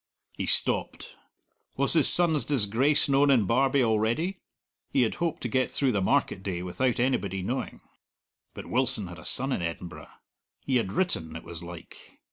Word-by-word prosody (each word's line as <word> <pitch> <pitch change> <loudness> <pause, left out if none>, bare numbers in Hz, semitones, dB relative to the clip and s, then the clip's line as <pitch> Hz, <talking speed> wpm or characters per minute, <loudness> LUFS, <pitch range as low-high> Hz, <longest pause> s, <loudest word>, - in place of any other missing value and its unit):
He - - -5
stopped. - - 0 0.6
Was 140 +1 +3
his 160 -4 +4
son's 165 -4 +4
disgrace 135 +4 +2
known 140 +1 +3
in 125 -7 +4
Barbie 130 +5 +2
already? 115 - 0 0.5
He 130 - +2
had 110 - -1
hoped 170 -2 -2
to - - -2
get 130 +2 0
through 135 -2 +1
the 100 -4 -1
market 105 -2 0
day 90 -3 -4
without 120 +8 -1
anybody 100 -7 -1
knowing. 125 +7 -4 0.7
But - - -8
Wilson 125 -4 +1
had 85 -2 -10
a 80 - -13
son 135 +2 +1
in 95 - -1
Edinburgh; 85 +1 -6 0.6
he 130 -2 +1
had 105 -5 -2
written, 80 - -1
it 85 - -8
was 85 -1 -8
like. 85 -1 -12
125 Hz, 170 wpm, -27 LUFS, 95-140 Hz, 0.7 s, his